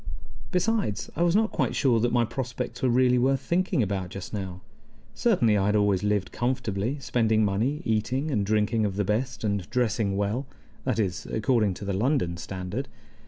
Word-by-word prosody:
Besides, 180 - 0
I 165 - -2
was 175 +1 +3
not 220 +1 +3
quite - - 0
sure 125 -5 +3
that 120 +2 +1
my 120 -1 +3
prospects 125 -1 -4
were 130 - +2
really 125 0 +4
worth 135 +2 +2
thinking 175 - +1
about 95 -3 -2
just 95 +2 -8
now. 95 -3 -5 0.5
Certainly, 120 - +3
I 100 - +1
had 105 - +2
always 100 -3 +3
lived 105 -2 0
comfortably, 120 -1 -1
spending 110 -5 +2
money, 115 +10 0
eating 125 +7 0
and 105 -6 +1
drinking 110 +2 +1
of 100 -2 -1
the 105 0 0
best, 115 +3 -1
and 100 -4 -1
dressing 110 -5 0
well 105 +7 -1 0.4
that - - 0
is, 95 -5 -1
according 110 -4 +1
to 100 - -7
the 100 - -1
London 105 - +1
standard. 95 +9 -5
110 Hz, 180 wpm, -26 LUFS, 100-130 Hz, 0.5 s, really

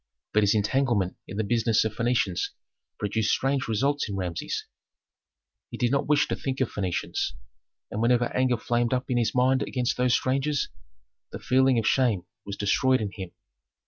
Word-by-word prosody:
But 105 - +4
his 105 +1 +3
entanglement 105 -3 +1
in 95 - -7
the 110 - +1
business 115 +1 +2
of 110 - -2
Phœnicians 115 -6 0 0.5
produced 105 +1 0
strange 135 0 0
results 135 +4 0
in 100 - -3
Rameses. 90 -3 -3 1.0
He - - -7
did 120 0 +1
not 140 - +1
wish 145 0 +3
to - - 0
think 135 -1 -4
of 130 - 0
Phœnicians, 90 -9 -2 0.6
and 105 - -3
whenever 120 +1 +2
anger 130 -1 +2
flamed 120 +2 0
up 125 0 -3
in 125 - +2
his 115 - 0
mind 130 +1 +3
against 125 -2 -1
those 125 0 +3
strangers 135 +2 0 0.6
the - - -5
feeling 130 0 +3
of 115 - 0
shame 115 -8 +2 0.2
was 100 - -5
destroyed 130 +6 +2
in 105 -2 -3
him. 95 -3 -7
120 Hz, 175 wpm, -26 LUFS, 105-130 Hz, 1.0 s, But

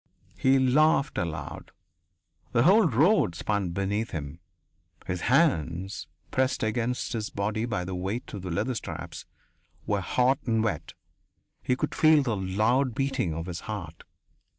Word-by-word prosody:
He 130 +1 +3
laughed 140 +3 +3
aloud. 85 -3 -5 0.8
The 120 - +4
white 190 -1 +5
road 155 - +4
spun 100 +1 -1
beneath 100 +5 -1
him. 75 +1 -6 0.7
His 90 -2 -3
hands, 95 - +1 0.2
pressed 130 -1 +1
against 120 +3 -1
his 110 -2 -3
body 105 +3 -2
by 90 -6 -2
the 95 - -5
weight 95 +7 -4
of 100 - -5
the 90 - -5
leather 110 +9 -1
straps, 85 -6 -7 0.6
were 100 -1 0
hot 125 +7 +2
and 115 -1 +2
wet; 110 - -2 0.7
he 125 - +1
could - - -2
feel 155 -2 +5
the 120 -5 0
loud 110 +7 +1
beating 135 - -1
of 80 0 -4
his 90 -2 -5
heart. 85 -7 -6
110 Hz, 145 wpm, -27 LUFS, 90-130 Hz, 0.8 s, white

